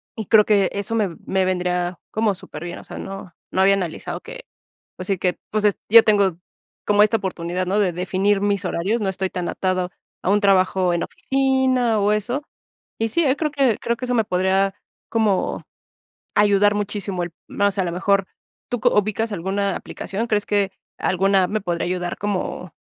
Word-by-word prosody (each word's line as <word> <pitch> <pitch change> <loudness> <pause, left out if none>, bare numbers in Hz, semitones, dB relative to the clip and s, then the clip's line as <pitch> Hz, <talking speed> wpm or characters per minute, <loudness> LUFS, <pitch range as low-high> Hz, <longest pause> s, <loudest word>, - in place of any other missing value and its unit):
y 220 - -5
creo 210 +2 +6
que 200 -3 +3
eso 200 +3 -2
me 200 -6 0
me 190 -1 +1
vendría 180 -1 -1
como 220 -2 +1
superbien. 170 0 -8
O - - -12
sea, - - -9
no 195 -2 -7 0.2
no 190 - +1
había 195 +1 +5
analizado 180 -5 -4
que, - - -10 0.5
pues 185 - -6
sí, 195 -2 +1
que, 180 -1 0
pues, 215 0 +1
es 205 - +3
yo 230 +1 +9
tengo 200 -5 +3 0.5
como 205 0 +5
esta 215 +1 +3
oportunidad, 180 -1 -3
¿no?, 195 - +1
de 185 -4 +2
definir 190 +3 +1
mis 200 -1 0
horarios, 195 +7 -1
no 195 - 0
estoy 190 0 -2
tan 180 -1 -3
atado 185 -1 -1 0.3
a - - 0
un 205 +1 +3
trabajo 185 -2 +3
en 170 - -1
oficina 260 -4 +1
o 205 +1 +2
eso. 240 +7 -1 0.6
Y 225 0 0
sí, 335 +10 +1
creo 310 -2 -1
que 270 -6 +2
creo 235 0 -1
que 255 - -6
eso 250 - 0
me 225 -3 +3
podría 190 +1 +1 0.3
como 215 -4 0 0.7
ayudar 205 0 +4
muchísimo 200 -3 -2
el 170 -1 -5 0.2
más. 200 0 0
A 190 - +2
lo 170 - -2
mejor, 195 +2 +1 0.4
¿tú 245 -3 -2
co - - +3
ubicas 215 +2 0
alguna 195 +2 -1
aplicación? 210 +4 -4
¿Crees 210 -3 0
que 200 -2 +1 0.3
alguna 190 0 +2
me 215 +1 -1
podría 175 -3 -2
ayudar 180 -1 -3
como, 185 -3 -3
200 Hz, 185 wpm, -22 LUFS, 185-215 Hz, 0.7 s, yo